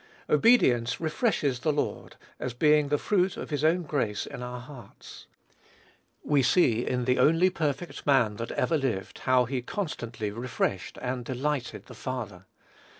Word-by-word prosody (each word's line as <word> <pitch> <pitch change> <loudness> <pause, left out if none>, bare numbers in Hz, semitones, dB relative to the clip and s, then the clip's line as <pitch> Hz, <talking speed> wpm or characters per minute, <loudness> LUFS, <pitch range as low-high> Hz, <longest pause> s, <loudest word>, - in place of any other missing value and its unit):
Obedience 125 - +4
refreshes 155 - 0
the 155 +4 +1
Lord, 150 - -3 0.2
as 125 -1 -4
being 150 +2 +4
the 145 +1 +1
fruit 190 +2 +1
of - - -7
his 145 -1 -1
own 170 +3 +3
grace 125 -10 -2
in - - -8
our 125 0 -5
hearts. 120 -4 -12 1.0
We 145 -2 +3
see 125 -4 +3
in 125 -1 -1
the 125 0 +2
only 165 +7 +4
perfect 155 -1 -3
man 120 -7 +3
that 115 - -4
ever 160 -2 +1
lived 115 -8 -3
how 130 -1 +5
he 130 +1 -3
constantly 120 - -4
refreshed 115 -5 -3
and 125 0 -2
delighted 130 +1 -3
the - - -12
Father. 105 -8 -6
130 Hz, 150 wpm, -27 LUFS, 120-150 Hz, 1.0 s, how